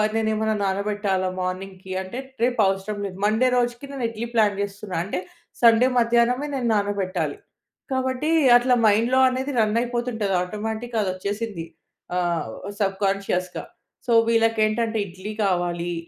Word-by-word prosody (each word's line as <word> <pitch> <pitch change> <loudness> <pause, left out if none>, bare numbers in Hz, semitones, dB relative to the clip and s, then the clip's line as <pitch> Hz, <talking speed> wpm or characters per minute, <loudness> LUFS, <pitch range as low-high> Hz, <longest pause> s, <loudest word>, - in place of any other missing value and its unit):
నేనేమన్నా 220 -1 +1
నానబెట్టాలా 195 -1 0
మార్నింగ్‌కి 185 +1 -5
అంటే, 190 +7 -6 0.2
రేపు 245 -1 +1
అవసరం 195 +2 -2
లేదు. 190 -1 -6
మండే 220 +5 +3
రోజుకి 240 +2 -1
నేను 270 -3 -5
ఇడ్లీ 230 +1 -5
ప్లాన్ 210 -3 +2
చేస్తున్నా. 200 -1 -5
అంటే, 180 -1 -3 0.4
సండే 230 +2 +6
మధ్యాహ్నమే 240 +4 +2
నేను 245 -3 -1
నానబెట్టాలి. 190 -7 -1 0.5
కాబట్టి 260 +3 -1 0.3
అట్లా 250 +1 +2
మైండ్‌లో 230 +5 +3
అనేది 260 +2 -2
రన్ 215 0 +2
అయిపోతుంటది 240 -5 -1
ఆటోమేటిక్‍గా 220 +5 -4
అది 190 - -1
వచ్చేసింది. 200 -1 -4 0.5
ఆహ్, 175 -3 0 0.4
సబ్కాన్షియస్‌గా. 195 -2 -1 0.4
సో, 240 - 0 0.2
వీళ్ళకి 225 -1 +2
ఏంటంటే 225 +1 -1
ఇడ్లీ 190 +4 -7
కావాలి, 175 -2 -1
210 Hz, 125 wpm, -23 LUFS, 190-235 Hz, 0.5 s, సండే